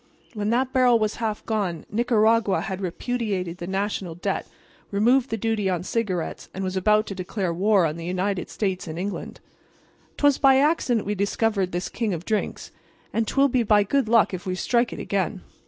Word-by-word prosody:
When 210 -2 -2
that 255 +3 +1
barrel 250 -2 +5
was 215 -1 -1
half 220 -2 -3
gone 200 -7 -2
Nicaragua 225 -2 +2
had 190 0 -4
repudiated 190 -2 -3
the 175 - -5
National 190 -3 -2
debt, 175 - -2 0.4
removed 240 +6 +3
the 225 - -2
duty 220 -2 0
on 180 -2 -1
cigarettes 190 -5 -3
and 190 - -3
was 185 0 -3
about 210 +3 +3
to 200 - -5
declare 185 -1 -3
war 195 +1 +3
on 155 0 -2
the 165 - -6
United 185 +1 -1
States 190 -4 -2
and 160 0 -6
England. 195 +3 -5 0.8
"'Twas 285 -2 +3
by 270 -1 +6
accident 270 -6 +2
we 205 - -1
discovered 200 -1 0
this 180 +2 -2
king 220 -6 -2
of 170 +1 -8
drinks, 215 -1 -2 0.4
and 225 -1 0
'twill 275 +4 +3
be 250 -1 +2
by 210 -2 +4
good 255 +2 0
luck 230 -3 +4
if 185 +1 -5
we 185 - -1
strike 235 +5 +1
it - - -6
again. 190 -1 -2
205 Hz, 190 wpm, -24 LUFS, 185-230 Hz, 0.8 s, by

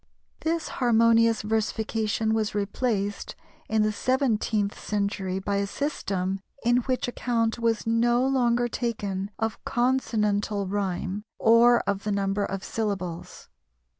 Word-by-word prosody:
This 325 0 -1
harmonious 230 -2 +4
versification 220 0 0
was 215 -2 -1
replaced 205 0 -2 0.3
in 220 -1 +2
the 215 - +2
seventeenth 220 -4 0
century 200 -2 -2
by 200 +1 -1
a 200 0 0
system 195 -8 -2 0.3
in 240 +1 +4
which 250 +1 -1
account 235 -2 -1
was 230 -2 0
no 240 +2 +2
longer 245 -3 +2
taken 205 -5 -3
of 225 0 -3
consonantal 215 -5 0
rhyme 195 0 -2 0.2
or 235 +1 +5
of 200 -1 -2
the 210 - -1
number 200 0 0
of 195 -1 -4
syllables. 190 -6 -4
220 Hz, 120 wpm, -26 LUFS, 200-235 Hz, 0.3 s, or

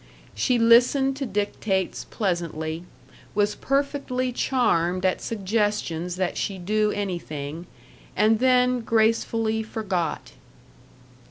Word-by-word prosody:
She 250 - +1
listened 245 +4 +5
to 275 -2 -3
dictates 205 -2 -2
pleasantly, 170 -4 -2 0.5
was 205 0 +2
perfectly 275 -2 -1
charmed 185 -9 +1
at 185 - +1
suggestions 205 -5 -1
that 185 -1 -2
she 195 - -2
do 210 +4 +1
anything, 170 -5 -4 0.5
and 215 +1 +3
then 250 0 +3
gracefully 225 0 +1
forgot. 200 -6 -3
210 Hz, 95 wpm, -24 LUFS, 180-235 Hz, 0.5 s, listened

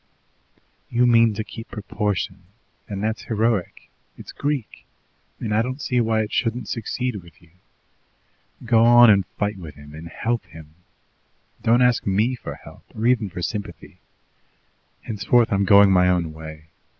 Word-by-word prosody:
"You 120 +1 +2
mean 115 -2 +4
to 110 - -3
keep 115 +2 -10
proportion, 100 -3 -3 0.4
and 100 -1 -4
that's 110 +1 -2
heroic, 110 -4 -1 0.3
it's - - -10
Greek, 145 -5 -4 0.5
and 110 -3 -3
I 110 - +3
don't 130 +4 -4
see 125 -4 0
why 110 -1 +1
it 110 - -4
shouldn't 115 -2 -1
succeed 125 +1 -3
with 85 -3 -14
you. 85 -2 -23 1.1
Go 115 -1 +4
on 120 -1 +8
and 100 -3 +2
fight 105 -1 -1
with 80 -4 -10
him 75 0 -14
and 80 +2 -9
help 115 +7 -2
him. 80 -1 -14 0.9
Don't 120 +2 +3
ask 125 -3 +2
ME 105 +6 +1
for 125 - -7
help, - - -15
or 110 - -3
even 120 -4 +2
for 90 0 -7
sympathy. 105 +1 -6 1.0
Henceforward 115 +2 +2
I'm 100 0 +2
going 100 0 +6
my 90 -1 +4
own 85 -3 0
way. 80 0 -11
110 Hz, 155 wpm, -22 LUFS, 95-120 Hz, 1.1 s, on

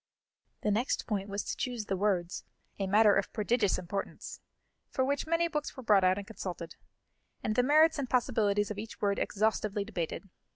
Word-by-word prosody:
The 210 - +2
next 230 +6 0
point 200 -2 -2
was 200 +1 -2
to - - -3
choose 245 -4 -3
the 195 - -1
words, 185 -3 0 0.4
a 195 - -1
matter 210 +1 +5
of 195 - 0
prodigious 215 -1 +1
importance, 195 +2 -5 0.5
for 260 - 0
which 285 +2 -1
many 335 +1 +2
books 300 -4 -4
were 260 - -7
brought 205 -4 +5
out 185 +1 +4
and 200 - -5
consulted, 180 -6 -6 0.7
and 215 - 0
the 250 - +5
merits 310 +4 +5
and 265 -3 -3
possibilities 215 -5 +1
of 205 - -5
each 220 +1 -8
word 200 -1 +1
exhaustively 210 -1 0
debated. 195 -2 -4
210 Hz, 180 wpm, -31 LUFS, 195-245 Hz, 0.7 s, matter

